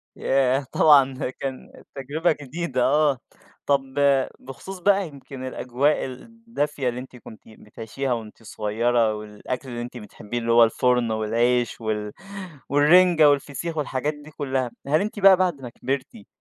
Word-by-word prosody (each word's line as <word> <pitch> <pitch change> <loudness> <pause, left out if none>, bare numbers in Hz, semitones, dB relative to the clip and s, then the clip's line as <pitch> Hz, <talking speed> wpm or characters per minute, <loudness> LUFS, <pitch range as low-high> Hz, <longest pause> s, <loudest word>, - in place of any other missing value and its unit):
ياه! 135 0 +1
طبعًا 140 -4 +5
ده 130 - -3
كان 130 0 -8
تجربة 145 +5 0
جديدة 140 -2 -2
آه. 145 0 +3 0.5
طَب 140 -1 +3 0.6
بخصوص 180 +9 -9
بقى 195 +1 +2
يمكن 135 -3 -10
الأجواء 130 +4 0
الدافية 150 - -4
اللي 120 +1 -5
أنتِ 130 0 -11
كنتِ 110 -2 -13
بتعيشيها 115 +4 -5
وأنتِ 115 -1 -7
صغيّرة، 110 +1 0
والأكل 105 +5 -6
اللي 120 -1 -5
أنتِ 125 +1 -7
بتحبيه 105 +1 -7
اللي 115 0 -1
هو 115 0 +7
الفرن 120 0 +2
والعيش 120 +3 0
وال 105 -1 -3 0.6
والرِنجة 155 +2 +6
والفسيخ 145 +3 -2
والحاجات 145 0 -1
دي 150 +1 -14
كلّها، 135 -4 -2 0.2
هل 155 +3 +3
أنتِ 210 +1 -4
بقى 195 -2 +7
بعد 175 -7 0
ما 125 - -7
كبرتي، 140 - -5
135 Hz, 145 wpm, -24 LUFS, 120-150 Hz, 0.6 s, هو